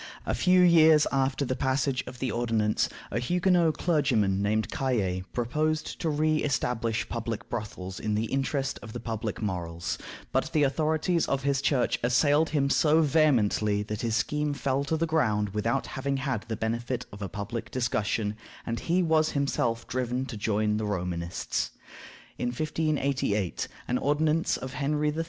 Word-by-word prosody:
A -, -, 0 dB
few 180 Hz, 0 st, +4 dB
years 160 Hz, -3 st, +6 dB
after 135 Hz, +1 st, +1 dB
the 130 Hz, -, -1 dB
passage 130 Hz, 0 st, 0 dB
of 125 Hz, -, -8 dB
the 130 Hz, 0 st, -2 dB
ordinance, 115 Hz, -3 st, +1 dB, 0.2 s
a -, -, 0 dB
Huguenot 175 Hz, +3 st, +2 dB
clergyman 120 Hz, -, +2 dB
named 110 Hz, +2 st, 0 dB
Cayet 95 Hz, -8 st, -1 dB
proposed 150 Hz, +6 st, -1 dB
to 165 Hz, -, 0 dB
re 155 Hz, +1 st, +2 dB
establish 120 Hz, -6 st, -1 dB
public 115 Hz, -2 st, -4 dB
brothels 95 Hz, -5 st, -5 dB
in 105 Hz, -1 st, -1 dB
the 110 Hz, +2 st, 0 dB
interest 135 Hz, +2 st, -1 dB
of 110 Hz, -2 st, -9 dB
the 120 Hz, -, -4 dB
public 110 Hz, -1 st, -4 dB
morals, 85 Hz, -4 st, -3 dB, 0.3 s
but -, -, 0 dB
the 150 Hz, -, +3 dB
authorities 155 Hz, +4 st, +1 dB
of 135 Hz, 0 st, -1 dB
his 140 Hz, -1 st, +1 dB
Church 135 Hz, -4 st, +1 dB
assailed 145 Hz, +6 st, +3 dB
him 140 Hz, -3 st, +1 dB
so 155 Hz, +3 st, +4 dB
vehemently 115 Hz, -9 st, +2 dB
that 105 Hz, 0 st, -5 dB
his 115 Hz, -2 st, 0 dB
scheme 150 Hz, +2 st, 0 dB
fell 135 Hz, 0 st, 0 dB
to 160 Hz, +2 st, 0 dB
the 165 Hz, -, +1 dB
ground 110 Hz, -11 st, +1 dB
without 115 Hz, +6 st, -1 dB
having 135 Hz, +1 st, -2 dB
had 135 Hz, -5 st, -2 dB
the 115 Hz, -, -2 dB
benefit 120 Hz, +3 st, -2 dB
of 100 Hz, -, -10 dB
a 95 Hz, -, -3 dB
public 105 Hz, +3 st, -5 dB
discussion, 110 Hz, -4 st, -1 dB, 0.3 s
and 115 Hz, 0 st, -2 dB
he 180 Hz, +2 st, +1 dB
was 160 Hz, -1 st, +3 dB
himself 120 Hz, -5 st, 0 dB
driven 125 Hz, +1 st, -1 dB
to 130 Hz, -, -7 dB
join 105 Hz, 0 st, 0 dB
the 110 Hz, -, -2 dB
Romanists. 90 Hz, -3 st, -2 dB, 0.7 s
In 120 Hz, -, 0 dB
1588 140 Hz, -, -1 dB, 0.2 s
an 125 Hz, -, 0 dB
ordinance 155 Hz, +3 st, +1 dB
of 130 Hz, 0 st, -7 dB
Henry 150 Hz, +2 st, 0 dB
III. -, -, -3 dB
130 Hz, 165 wpm, -28 LUFS, 110-150 Hz, 0.7 s, years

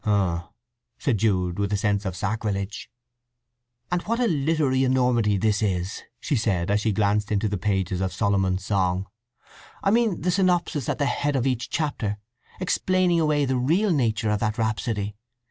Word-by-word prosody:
"H'm!" 95 Hz, -5 st, +1 dB, 0.6 s
said 125 Hz, -9 st, 0 dB
Jude, 95 Hz, -4 st, +1 dB
with 100 Hz, 0 st, 0 dB
a 100 Hz, -, +2 dB
sense 100 Hz, 0 st, 0 dB
of 95 Hz, -2 st, -3 dB
sacrilege. 105 Hz, 0 st, -3 dB, 1.0 s
"And 175 Hz, 0 st, +1 dB
what 230 Hz, +5 st, -2 dB
a 250 Hz, -, +3 dB
literary 150 Hz, -, +1 dB
enormity 125 Hz, -5 st, +2 dB
this 105 Hz, +1 st, +1 dB
is," 95 Hz, -2 st, -1 dB, 0.2 s
she 145 Hz, -, -1 dB
said, 100 Hz, -6 st, 0 dB
as 105 Hz, 0 st, +2 dB
she 110 Hz, -, +1 dB
glanced 105 Hz, 0 st, +1 dB
into 105 Hz, +1 st, +1 dB
the 100 Hz, -2 st, -2 dB
pages 95 Hz, -2 st, -1 dB
of 95 Hz, -1 st, -1 dB
Solomon's 95 Hz, -3 st, 0 dB
Song. 95 Hz, -2 st, 0 dB, 0.8 s
"I 195 Hz, -, +3 dB
mean 225 Hz, -4 st, +2 dB
the 180 Hz, -, +1 dB
synopsis 175 Hz, -, +1 dB
at -, -, 0 dB
the 145 Hz, -, +1 dB
head 145 Hz, +1 st, 0 dB
of 130 Hz, -2 st, +1 dB
each 125 Hz, -3 st, -1 dB
chapter, 130 Hz, -10 st, -2 dB, 0.4 s
explaining 185 Hz, -1 st, +2 dB
away 150 Hz, -2 st, +2 dB
the 130 Hz, -1 st, 0 dB
real 170 Hz, +12 st, +2 dB
nature 110 Hz, -7 st, +1 dB
of 105 Hz, -, +1 dB
that 110 Hz, +1 st, -1 dB
rhapsody. 110 Hz, -2 st, -1 dB
110 Hz, 170 wpm, -25 LUFS, 100-145 Hz, 1.0 s, a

